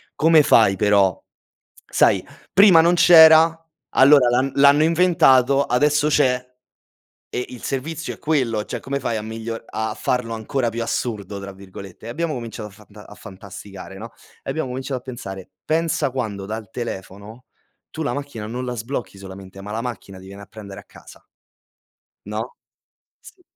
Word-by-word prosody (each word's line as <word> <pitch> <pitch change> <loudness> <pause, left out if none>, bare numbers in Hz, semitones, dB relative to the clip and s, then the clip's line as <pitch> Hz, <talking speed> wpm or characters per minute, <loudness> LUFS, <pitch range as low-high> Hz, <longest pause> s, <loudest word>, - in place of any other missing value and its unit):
come 160 -1 +5
fai 110 -7 +4
però? 100 -3 +2 0.6
Sai, - - +2 0.3
prima 195 -3 +7
non 170 +2 +3
c'era, 160 -1 +7 0.4
allora 135 -2 +6
l'han 130 +3 +1
l'hanno 140 +2 +5
inventato, 140 -6 +3
adesso 145 +4 +2
c'è. 125 -4 +1 0.8
E 125 - -3
il 125 - -11
servizio 160 +4 -4
è - - -18
quello, 125 -9 -1
cioè, - - -6
come 140 +1 -4
fai 120 -3 -2
a 110 - -4
miglio 115 +1 -6
a 110 0 -4
farlo 115 +1 -2
ancora 115 +3 -2
più 115 +1 -4
"assurdo" 105 -4 -4
tra 100 0 -8
virgolette?" 95 +1 -12
E - - -7
abbiamo 155 +6 -3
cominciato 115 -3 -7
a - - -20
fanta 105 0 -16
a - - -13
fantasticare, 95 0 -11
no, 115 +3 -9 0.3
e - - -5
abbiamo 160 +1 -3
cominciato 130 +1 -4
a - - -29
pensare: 95 -7 -8 0.2
"Pensa 160 -3 0
quando 110 -7 -4
dal 110 -1 -7
telefono, 105 +1 -8 0.5
tu 160 - -5
la 130 - -2
macchina 140 -7 -6
non 125 +3 -5
la 125 -1 -4
sblocchi 115 -1 -5
solamente, 95 0 -11
ma 100 - -9
la 110 - -3
macchina 105 -6 -7
ti 95 - -14
viene 100 +1 -11
a - - -13
prendere 100 -3 -11
a - - -21
casa". - - -17 1.0
No? 110 +4 -6 0.7
Sì 365 - -17
120 Hz, 165 wpm, -21 LUFS, 105-140 Hz, 1.0 s, prima